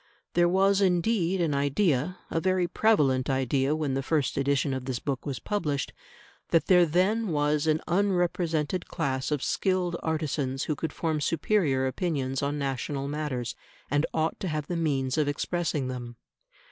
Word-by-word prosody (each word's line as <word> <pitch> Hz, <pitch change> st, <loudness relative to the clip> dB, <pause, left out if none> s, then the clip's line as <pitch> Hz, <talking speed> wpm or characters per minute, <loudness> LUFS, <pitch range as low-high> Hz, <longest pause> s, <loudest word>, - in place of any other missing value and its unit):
There 175 Hz, 0 st, +4 dB
was 195 Hz, +2 st, +3 dB
indeed 185 Hz, 0 st, +2 dB
an 160 Hz, -4 st, +1 dB
idea 145 Hz, +3 st, +1 dB
a 165 Hz, -, +1 dB
very 185 Hz, -1 st, +2 dB
prevalent 150 Hz, -, +2 dB
idea 135 Hz, +2 st, +1 dB
when 150 Hz, -4 st, -1 dB
the 135 Hz, -, 0 dB
first 145 Hz, -1 st, 0 dB
edition 140 Hz, 0 st, +1 dB
of 130 Hz, -1 st, -4 dB
this 130 Hz, -2 st, -2 dB
book 135 Hz, +2 st, -4 dB
was 135 Hz, -3 st, -2 dB
published 150 Hz, -10 st, -2 dB, 0.6 s
that 165 Hz, -, +3 dB
there 180 Hz, -2 st, +5 dB
then 195 Hz, +8 st, +2 dB
was 150 Hz, -2 st, +1 dB
an 155 Hz, 0 st, +2 dB
unrepresented 175 Hz, -3 st, 0 dB
class 130 Hz, -1 st, -2 dB
of 150 Hz, -3 st, -1 dB
skilled 185 Hz, -2 st, 0 dB
artisans 145 Hz, -4 st, -1 dB
who 155 Hz, -, -1 dB
could 160 Hz, +1 st, -3 dB
form 160 Hz, -1 st, -1 dB
superior 150 Hz, -4 st, +1 dB
opinions 135 Hz, -2 st, -1 dB
on 140 Hz, +1 st, -1 dB
national 140 Hz, 0 st, -2 dB
matters, 140 Hz, -5 st, -3 dB, 0.4 s
and 145 Hz, +2 st, +2 dB
ought 160 Hz, 0 st, -1 dB
to 190 Hz, -, -3 dB
have 155 Hz, -3 st, -2 dB
the 175 Hz, -, -3 dB
means 140 Hz, -4 st, 0 dB
of 150 Hz, -, +2 dB
expressing 150 Hz, -1 st, -1 dB
them. 120 Hz, -2 st, -6 dB
150 Hz, 160 wpm, -27 LUFS, 135-175 Hz, 0.6 s, there